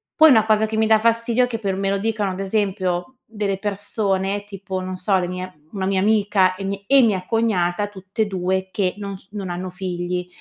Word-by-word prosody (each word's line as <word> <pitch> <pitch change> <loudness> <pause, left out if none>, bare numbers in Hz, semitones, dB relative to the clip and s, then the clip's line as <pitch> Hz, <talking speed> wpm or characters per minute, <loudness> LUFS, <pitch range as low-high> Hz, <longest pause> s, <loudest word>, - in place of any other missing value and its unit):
Poi 315 0 +8
una 220 -5 +6
cosa 220 0 +3
che 220 0 -4
mi 220 0 +3
dà 220 -1 +5
fastidio 230 +2 +2
è - - -6
che 235 -2 -3
per 195 -3 -1
me 195 0 0
lo 200 - +1
dicano 210 -2 -1
ad 185 - -5
esempio, 190 +1 -1
delle 205 -3 -2
persone 200 -1 -1
tipo 195 -2 -5
non 185 0 -5
so, 190 +1 +2
le 180 - -1
mie 180 -3 -7
una 190 -2 -3
mia 190 -1 +1
amica 200 -3 +3
e 195 - -6
mi 195 0 -4
e 275 +3 +6
mia 200 -6 +2
cognata, 205 -3 +1
tutt'e 200 +2 -3
2 190 0 -1
che 185 -3 0
non 200 -2 -5
s 190 - -18
non 200 -3 -5
hanno 180 +1 -4
figli. 180 -1 -3
195 Hz, 220 wpm, -22 LUFS, 185-215 Hz, -, Poi